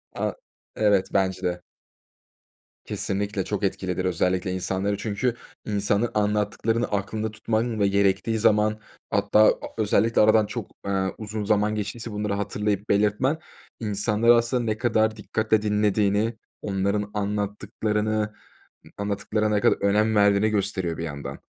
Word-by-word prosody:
A, - - -2 0.4
evet, 100 -3 +3
bence 95 -1 +1
de. 90 -1 -2 1.2
Kesinlikle, 100 0 -2
çok 105 -1 -3
etkilidir 95 -1 -1
özellikle 90 +1 0
insanları 95 +2 -1
Çünkü 115 +4 -1 0.3
insanı, 105 +2 0
anlattıklarını 105 +2 0
aklında 105 +2 -2
tutman 110 +1 -1
ve 100 - +3
gerektiği 100 +3 +1
zaman, 105 0 +3 0.3
hatta 100 +1 +2
a - - +7 0.3
özellikle 110 +1 +2
aradan 110 0 +5
çok, - - -6
eee, 95 -1 0
uzun 110 0 -4
zaman 105 +1 +2
geçtiyse 110 +3 -4
bunları 105 0 -2
hatırlayıp 105 0 -2
belirtmen 105 +8 +2 0.4
insanları 105 +2 +3
aslında 120 +1 +1
ne 110 -2 -1
kadar 110 -2 +1
dikkatle 110 +1 0
dinlediğini, 105 +1 +1 0.2
onların 100 +1 -1
anlattıklarını 105 +1 -1 0.6
anlattıklarına 105 +1 -1
ne 105 - +1
kadar - - +4
önem 105 +2 +3
verdiğini 100 +1 +4
gösteriyor 95 -5 -1
bir - - -4
yandan. 75 -3 -6
105 Hz, 125 wpm, -25 LUFS, 100-110 Hz, 1.2 s, a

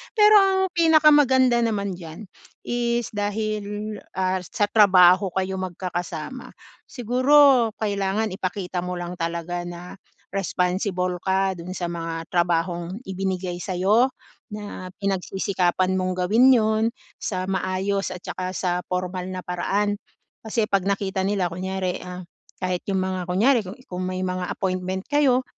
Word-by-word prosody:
Pero 420 -1 +7
ang 380 -1 +2
pinakamaganda 295 -7 +5
naman 210 -4 0
diyan 165 +5 -9 0.4
is 240 -1 -1
dahil, 210 0 -3 0.2
ah, 185 0 0
sa 180 +3 -3
trabaho 190 -2 +6
kayo 190 0 -1
magkakasama, 180 +3 -5 0.3
siguro 255 +1 +4 0.2
kailangan 200 0 0
ipakita 185 -1 -3
mo 180 0 -3
lang 175 0 -6
talaga 170 +1 -3
na 175 +1 -8 0.4
responsible 180 -1 -1
ka 190 +1 +1
dun 180 +2 -7
sa 175 -2 -3
mga 165 -1 -4
trabahong 175 +3 0
ibinigay 185 -2 -3
sa'yo, 195 +8 +2 0.5
na 205 -3 -7 0.2
pinagsisikapan 185 -1 0
mong 185 0 -1
gawin 235 +7 +5
'yon, 220 -1 +2 0.4
sa 185 -2 -3
maayos 190 +1 -1
at 180 - -11
saka 185 0 -4
sa 180 -1 0
pormal 180 0 -3
na 185 -1 -5
paraan. 205 +3 -1 0.5
Kasi 225 +1 0
'pag 195 -3 +1
nakita 195 -1 -1
nila 195 -3 +1
kunyari, 185 +1 -3
ah, 180 0 -7 0.4
kahit 185 -1 0
yung 190 -1 0
mga 185 -1 -3
kunyari, 225 +8 +3
ku 185 +3 -7
kung 180 0 -4
may 185 0 -3
mga 185 0 -2
appointment 185 0 -2
kayo, 270 -3 +3
190 Hz, 130 wpm, -24 LUFS, 180-215 Hz, 0.5 s, Pero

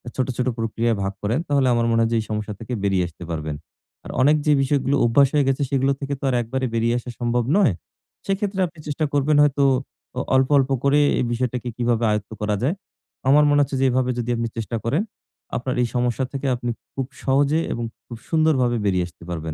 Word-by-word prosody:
ছোট, 130 - 0
ছোট 125 - 0
প্রক্রিয়ায় 115 0 0
ভাগ 95 0 -2
করেন 110 +7 0
তাহলে 140 -2 +2
আমার 115 0 +2
মনে 115 0 +3
হয় 115 - +2
যে 115 - +3
এই - - -8
সমস্যা 105 0 -3
থেকে 115 +2 -6
বেরিয়ে 95 -2 +2
আসতে 85 +1 -12
পারবেন। 75 -2 -3 0.5
আর - - -7
অনেক 145 +4 +5
যে 150 - +4
বিষয়গুলো 140 0 +1
অভ্যাস 135 +4 +5
হয়ে 145 - +3
গেছে 135 +1 +1
সেগুলো 135 0 +2
থেকে 140 0 -3
তো - - -14
আর 125 - +1
একবারে 130 +3 -2
বেরিয়ে 115 +1 +1
আসা 125 - -9
সম্ভব 120 0 +1
নয়। 180 - +4 0.5
সেক্ষেত্রে 195 0 -1
আপনি 165 -1 -17
চেষ্টা 150 +1 -1
করবেন 145 +1 +2
হয়তো, 140 -1 +2 0.5
আ - - +1 0.2
অল্প, 130 +1 +3
অল্প 135 -1 +2
করে 140 +1 +4 0.2
এই - - +1
বিষয়টাকে 125 0 -2
কিভাবে 120 -1 +1
আয়ত্ত 105 0 -2
করা 105 0 0
যায়। 150 +8 +1 0.5
আমার 150 +2 +6
মনে 145 - +4
হচ্ছে 140 0 -1
যে - - +4
এভাবে 125 0 +1
যদি 120 0 -3
আপনি 115 0 -1
চেষ্টা 115 +1 -3
করেন, 135 +10 +1 0.6
আপনার 130 +1 -3
এই 120 - +2
সমস্যা 125 +1 0
থেকে 140 0 -3
আপনি 120 0 -4 0.3
খুব 135 -1 -2 0.2
সহজে 140 +3 +2
এবং 120 - -4 0.2
খুব 120 - -8
সুন্দরভাবে 145 -7 +2
বেরিয়ে 90 -3 +1
আসতে 85 -1 -17
পারবেন। 80 -2 -4
125 Hz, 210 wpm, -22 LUFS, 115-140 Hz, 0.6 s, আমার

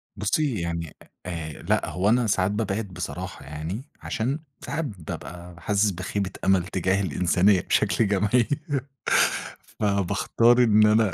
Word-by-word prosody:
بُصّي 110 - 0
يعني 85 -2 -4 0.3
أ 85 -3 -4
لأ، - - 0
هو 95 +3 +1
أنا 120 0 +3
ساعات 95 -1 +2
بابعد 105 0 -2
بصراحة 85 -5 -6
يعني 80 - -5 0.2
عشان 130 +7 -2 0.3
ساعات 165 0 -2
بابقى 90 - -8
حاسس 105 0 +2
بخيبة 95 +2 -3
أمل 95 -2 +4
تجاه 95 +1 0
الإنسانية 90 +2 +3
بشكل 110 - +2
جماعي 105 +4 +2 1.3
فباختار 110 +4 +3
إن 105 -1 +5
أنا 110 -2 +4
100 Hz, 125 wpm, -25 LUFS, 90-110 Hz, 1.3 s, إن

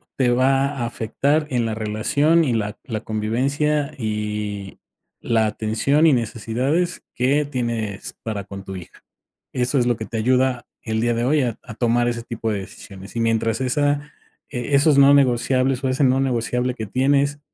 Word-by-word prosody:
te 130 -2 +2
va 135 +2 +3
a 140 -4 -3
afectar 140 +7 0
en 120 -3 0
la 110 -1 -2
relación, 140 +10 +2
y 125 - 0
la 105 -1 -2
la 110 -4 -4
convivencia 140 +8 -1
y 105 -3 -4 0.4
la 110 -2 +1
atención 110 +9 +1
y 155 - +5
necesidades 125 - -1
que 135 +4 +2
tienes 115 -7 -3
para 105 -3 -4
con 100 0 -8
tu 95 -1 -7
hija. 90 - -12 0.5
Eso 125 +2 +1
es 120 - +2
lo 120 - +2
que 110 - -5
te 115 - -6
ayuda 125 +1 +1 0.2
el 110 -1 -2
día 120 +1 +1
de 115 +1 -1
hoy 145 +2 +2
a 120 -3 -2
a 115 - -9
tomar 120 +1 +1
ese 115 -1 -3
tipo 115 -1 -3
de 105 - -1
decisiones. 95 0 -11
Y 115 - -2
mientras 115 0 +1
esa 145 +3 0 0.4
e 130 +1 -3
esos 140 0 +5
no 140 +1 +7
negociables 130 0 +2
o - - +2
ese 130 +2 0
no 130 -1 +4
negociable 125 -1 0
que 110 -3 -5
tienes, 140 +5 +1
120 Hz, 180 wpm, -22 LUFS, 110-140 Hz, 0.5 s, no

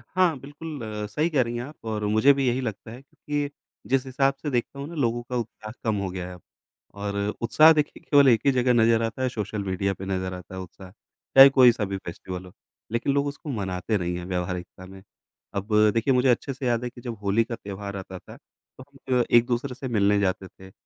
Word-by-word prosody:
हाँ, 180 -6 +3
बिल्कुल 145 +2 -8 0.3
सही 155 +10 0
कह 145 -5 +2
रही 120 0 -5
हैं 120 - -3
आप 145 -3 -12
और 105 -1 -3
मुझे 110 +7 +5
भी 135 -2 0
यही 125 +2 +1
लगता 110 -2 -5
है 125 +3 -10
कि, 145 +1 -4 0.4
जिस 135 0 +1
हिसाब 135 +1 +1
से 150 - -2
देखता 125 +2 -2
हूँ 140 - -5
ना 170 - -9
लोगों 120 -4 0
का 125 - -3
उत्साह 110 -2 -6
कम 110 -2 +1
हो 95 - -2
गया 90 -1 -5
है 90 - -9 0.6
और 100 0 -4 0.2
उत्साह 155 +8 +6
देखिए 150 -1 -1
केवल 140 -2 +5
1 115 -3 +4
ही 140 - +5
जगह 125 -1 +2
नज़र 115 -1 +4
आता 115 +3 -3
है 130 - +1
सोशल 105 -3 -4
मीडिया 95 +1 -1
पे 95 - -8
नज़र 95 -1 -2
आता 90 +1 -9
है 95 - -5
उत्साह। 90 +1 -12
चाहे 135 +6 +5
कोई 130 -3 +7
सा 110 -3 -2
भी 95 0 -4
फेस्टिवल 90 +1 -7
हो, 90 - -13 0.4
लेकिन 115 +4 0
लोग 140 0 +1
उसको 145 +1 -7
मनाते 100 -2 -2
नहीं 90 -2 -2
है 90 - -6
व्यवहारिकता 90 0 -4
में। 95 0 -13 0.5
अब 100 +1 -3 0.3
देखिए 115 +4 +2
मुझे 125 +1 +3
अच्छे 125 +3 +1
से 130 0 -4
याद 120 0 +1
है 125 - -2
कि 120 - -14
जब 115 -2 -6
होली 100 +3 +2
का 115 0 -5
त्योहार 100 -2 -7
आता 95 -1 -8
था, - - -14
तो 130 - -19 0.3
हम 125 -1 +4
एक-दूसरे 120 +2 +2
से 135 0 -6
मिलने 105 -3 +2
जाते 95 -1 -1
थे 95 0 -16
115 Hz, 225 wpm, -25 LUFS, 95-135 Hz, 0.6 s, कोई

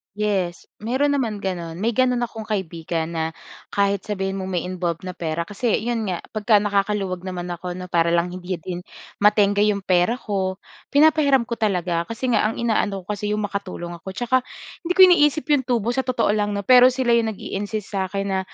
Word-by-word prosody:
Yes, 195 -4 -1 0.2
meron 260 +7 +1
naman 225 -8 -2
gano'n. 170 -3 -3
May 230 - +2
gano'n 250 0 +2
akong 225 -2 -6
kaibigan 170 -4 -3
na 160 -1 -1 0.5
kahit 200 -1 +1
sabihin 195 -2 -2
mo 190 - -4
may 180 -2 -1
involved 180 -2 -3
na 185 - -4
pera. 170 -1 -3
Kasi 210 +5 -2
'yon 230 -2 -1
nga 180 -3 -3
'pagka 215 0 +3
nakakaluwag 200 -2 0
naman 180 -1 -5
ako 175 +1 -5
'no, 185 0 -6
para 170 -1 +3
lang 170 +1 +1
hindi 180 0 -4
din 175 +1 -6 0.4
matengga 205 -1 +4
'yong 210 -2 +1
pera 185 +5 +2
ko, 190 -4 -2 0.4
pinapahiram 285 -4 +5
ko 235 - -5
talaga 180 -5 0
kasi 235 +3 -2
nga 215 - +3
ang - - -5
inaano 215 -4 0
ko 210 - -3
kasi 210 0 -4
'yong 210 - -1
makatulong 185 -4 -5
ako, - - -19
'tsaka 245 +4 +2 0.5
hindi 355 - +1
ko - - +8
iniisip 310 -4 +4
'yong 265 -3 +2
tubo 235 -2 +1
sa 265 - +1
totoo 250 -4 +1
lang 210 -1 0
'no, 200 - -3
pero 250 +1 +8
sila 255 -2 +1
'yong 230 -1 +3
nag-iinsist 205 +1 -4
sa 190 -1 -1
akin 195 +1 -2
na, 195 -1 0
200 Hz, 195 wpm, -22 LUFS, 185-235 Hz, 0.5 s, ko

